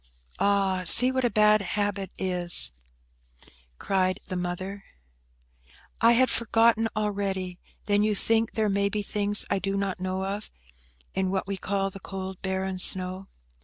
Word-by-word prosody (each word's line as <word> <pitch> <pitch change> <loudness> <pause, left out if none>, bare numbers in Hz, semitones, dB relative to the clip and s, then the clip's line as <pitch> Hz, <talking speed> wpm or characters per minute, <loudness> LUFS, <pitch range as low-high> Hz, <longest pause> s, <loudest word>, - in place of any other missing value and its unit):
"Ah, 195 -2 +1
see 250 +8 +7
what 260 0 -1
a 245 - +2
bad 210 0 +3
habit 200 -1 -2
is!" 180 - +1 1.1
cried 185 -1 -1
the 185 - -4
mother. 185 +3 -5 1.2
"I 230 +1 +6
had 255 +1 +3
forgotten 225 0 +2
already. 195 -3 -3 0.3
Then 205 -1 +1
you 210 0 +1
think 225 +2 0
there 220 -1 0
may 200 0 0
be 210 0 -3
things 205 0 +1
I 200 - +1
do 195 +1 -3
not 195 -2 -3
know 185 +1 -3
of, 200 +2 -5 0.6
in 190 0 -1
what 190 0 -2
we 195 +1 -4
call 195 +1 -2
the 195 - -10
cold, 190 -1 -7
barren 190 -1 -3
snow?" 185 +1 +3
195 Hz, 150 wpm, -26 LUFS, 190-210 Hz, 1.2 s, see